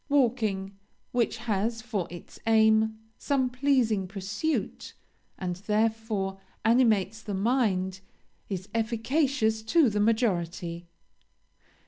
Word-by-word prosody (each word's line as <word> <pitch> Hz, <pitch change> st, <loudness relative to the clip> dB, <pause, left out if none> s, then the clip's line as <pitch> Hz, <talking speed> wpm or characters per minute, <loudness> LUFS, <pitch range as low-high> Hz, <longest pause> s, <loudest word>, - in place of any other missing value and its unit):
Walking, 220 Hz, -8 st, +1 dB, 0.3 s
which 235 Hz, -2 st, +1 dB
has 225 Hz, 0 st, -1 dB
for 210 Hz, -7 st, -2 dB
its 175 Hz, 0 st, -11 dB
aim 220 Hz, 0 st, +4 dB, 0.2 s
some 265 Hz, -3 st, +1 dB
pleasing 250 Hz, -7 st, +2 dB
pursuit, 205 Hz, -, -3 dB, 0.4 s
and, 180 Hz, -2 st, -3 dB
therefore, 210 Hz, -1 st, -1 dB, 0.3 s
animates 220 Hz, -3 st, +3 dB
the 210 Hz, -3 st, -4 dB
mind, 190 Hz, -4 st, +1 dB, 0.5 s
is 190 Hz, -1 st, -4 dB
efficacious 230 Hz, 0 st, +1 dB
to 265 Hz, +2 st, +3 dB
the 210 Hz, -, -1 dB
majority. 175 Hz, -6 st, 0 dB
220 Hz, 95 wpm, -28 LUFS, 195-235 Hz, 0.5 s, aim